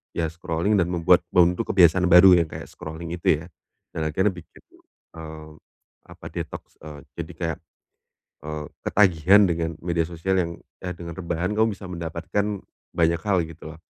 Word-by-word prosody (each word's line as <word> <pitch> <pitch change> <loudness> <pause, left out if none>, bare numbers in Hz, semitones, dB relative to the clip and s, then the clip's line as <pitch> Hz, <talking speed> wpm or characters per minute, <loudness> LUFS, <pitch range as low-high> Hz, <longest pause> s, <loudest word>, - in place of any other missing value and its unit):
ya 85 - 0
scrolling 85 +4 -1
dan 85 - +2
membuat 85 -2 +3
membentuk 90 0 +3
kebiasaan 90 -1 +5
baru 90 +1 +8
yang 85 - 0
kayak - - -8
scrolling 80 +1 -8
itu 80 -2 +1
ya, - - -11 0.5
dan 80 -1 -2
akhirnya 95 +6 +1
bikin, 90 -2 -14 0.5
mmm, 80 -1 -10 0.5
apa, - - -14
detoks, - - -7
eee, 75 -1 -10 0.2
jadi - - -5
kayak, 80 -3 -2 0.9
eee, 75 0 -5 0.2
ketagihan 95 0 +5
dengan 85 -1 -1
media 85 -1 0
sosial 95 +3 0
yang 85 -1 -2 0.3
eh 90 -1 -3
dengan 85 0 -7
rebahan 85 +1 -2
kamu 110 +1 +3
bisa 100 - -12
mendapatkan 85 +3 -3 0.5
banyak 85 0 +2
hal 100 -1 +2
gitu 80 -1 -10
loh. - - -20
85 Hz, 160 wpm, -24 LUFS, 80-90 Hz, 0.9 s, baru